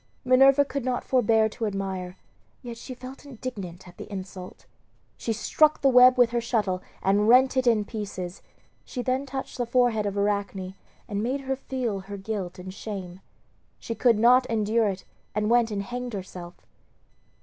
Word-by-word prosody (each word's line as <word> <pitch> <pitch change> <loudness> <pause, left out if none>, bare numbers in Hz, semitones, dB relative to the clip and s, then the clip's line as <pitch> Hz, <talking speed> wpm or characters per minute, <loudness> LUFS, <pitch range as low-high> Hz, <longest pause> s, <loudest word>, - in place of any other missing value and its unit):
Minerva 270 +2 +6
could 280 -1 -4
not 250 -1 -1
forbear 225 -3 +3
to 225 0 -3
admire, 190 -2 -4 0.5
yet 240 -1 -6
felt 255 +1 -9
indignant 215 -10 -7
at 175 - -15
the - - -9
insult. 185 -1 -8 0.5
She 230 - -3
struck 305 +7 +2
the 275 - +6
web 250 0 +7
with 245 -2 +5
her 240 0 0
shuttle 210 -6 -1 0.2
and 205 +2 +3
rent 260 +2 +6
it 260 -1 +1
in 220 -3 +3
pieces, 195 -4 -6 0.4
she 250 - -5
then 260 +2 -1
touched 265 -1 -6
the 245 - +1
forehead 235 -4 +2
of 200 0 -3
Arachne 200 -2 -1 0.3
and 205 -1 -2
made 260 +5 -1
her 265 0 -2
feel 255 -6 -3
her 200 +1 -8
guilt 195 -3 -5
and 185 +1 -8
shame. 190 -4 -7 0.6
She 230 - -5
could 230 0 +3
not 250 +3 +5
endure 220 0 +1
it 195 -1 -4 0.3
and 210 +1 0
went 240 -1 +4
and 200 -2 -3
hanged 245 +2 -5
herself. 180 -3 -7
225 Hz, 170 wpm, -26 LUFS, 195-250 Hz, 0.6 s, web